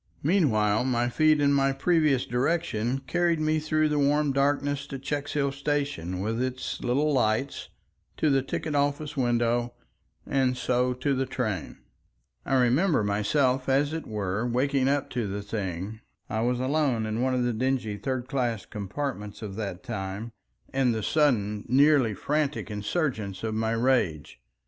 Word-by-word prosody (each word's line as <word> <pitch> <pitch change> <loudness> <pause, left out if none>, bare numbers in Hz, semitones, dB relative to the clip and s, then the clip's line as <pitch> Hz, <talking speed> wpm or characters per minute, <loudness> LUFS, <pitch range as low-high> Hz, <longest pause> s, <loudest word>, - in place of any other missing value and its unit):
Meanwhile 125 - +2
my 120 -2 +1
feet 155 +3 +3
and 140 -1 +3
my 135 -1 +3
previous 150 -2 +2
direction 130 -2 0
carried 175 -2 +1
me 155 0 +1
through 155 0 +1
the 150 -1 0
warm 145 0 +2
darkness 140 0 0
to 135 - -5
Checkshill 140 +1 -2
station 140 - -2
with 110 +4 -1
its 130 0 -3
little 145 +5 +1
lights, 125 +1 0 0.5
to 155 - +2
the 135 -1 +3
ticket 150 +3 -4
office 145 +1 0
window, 120 -2 +1 0.5
and 130 -2 +1
so 125 0 +1
to 140 +3 0
the 135 0 -1
train. 120 - -4 0.6
I 135 - +2
remember 130 - +3
myself 125 +6 +1
as 140 +3 +2
it 160 -1 -4
were 105 +1 -2
waking 130 +2 +1
up 140 0 0
to 120 -4 -2
the 100 +1 -4
thing—I 100 +2 -5
was 120 +1 +1
alone 130 -4 +1
in 110 +2 -2
one 130 0 +1
of 125 - +1
the 120 -1 0
dingy 120 -2 -1
"third 130 +3 -3
class" 120 -6 -1
compartments 105 0 -5
of 100 -2 -6
that 100 -3 -5
time—and 110 - -3
the 110 - -3
sudden 105 -10 +1
nearly 135 -3 +4
frantic 150 -3 -1
insurgence 105 - -2
of 110 -1 -1
my 110 +1 0
rage. 115 - 0
130 Hz, 150 wpm, -27 LUFS, 110-145 Hz, 0.6 s, nearly